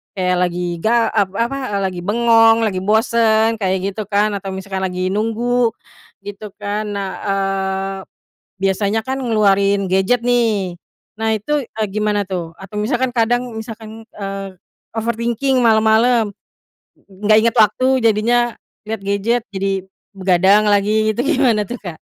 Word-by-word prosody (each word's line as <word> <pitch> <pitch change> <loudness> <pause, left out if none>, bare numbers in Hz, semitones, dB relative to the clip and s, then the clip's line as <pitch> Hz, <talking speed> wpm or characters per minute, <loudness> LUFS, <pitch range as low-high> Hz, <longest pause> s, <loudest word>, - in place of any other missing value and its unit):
kayak 180 -1 +1
lagi 175 -1 -4
ga 230 +3 +2
ep 205 -3 +2
apa, 235 +5 -1 0.2
eee, 200 - 0
lagi 175 - -7
bengong, 225 0 +4
lagi 195 -4 0
bosan 220 +2 +2
kayak 190 0 -1
gitu, 210 0 -6
kan. 210 +1 +1
Atau 195 -1 -5
misalkan 190 0 -5
lagi 185 0 -2
nunggu 230 +2 0 0.5
gitu, 205 0 -9
kan. 210 +1 -3
Nah, 200 -1 -3 0.2
eee, 195 0 -1 0.6
biasanya 200 +3 +1
kan 260 +4 -3
ngeluarin 200 -5 +2
gadget, 190 +6 +2
nih, 225 -7 0 0.4
nah 225 0 -1
itu, 295 +9 -4
eee, 220 -2 -4
gimana, 210 0 0
tuh? 175 -3 -5
Atau 195 +2 -9
misalkan 245 +3 0
kadang, 245 +1 0
misalkan, 220 0 -9
eee, 195 -1 -6 0.4
overthinking 235 +3 0
malam-malam, 220 0 +3 0.9
gak 215 +1 +6
ingat 230 +1 +1
waktu 220 +3 +4 0.2
jadinya, 235 +2 +2 0.3
liat 220 -2 -4
gadget 210 +4 0
jadi 195 0 -2 0.3
begadang 190 +2 +3
lagi 210 +2 +2
gitu 235 - -1
gimana, 260 -8 +2
tuh, 245 +5 -6
Kak? 175 -5 -7
215 Hz, 140 wpm, -18 LUFS, 195-230 Hz, 0.9 s, gak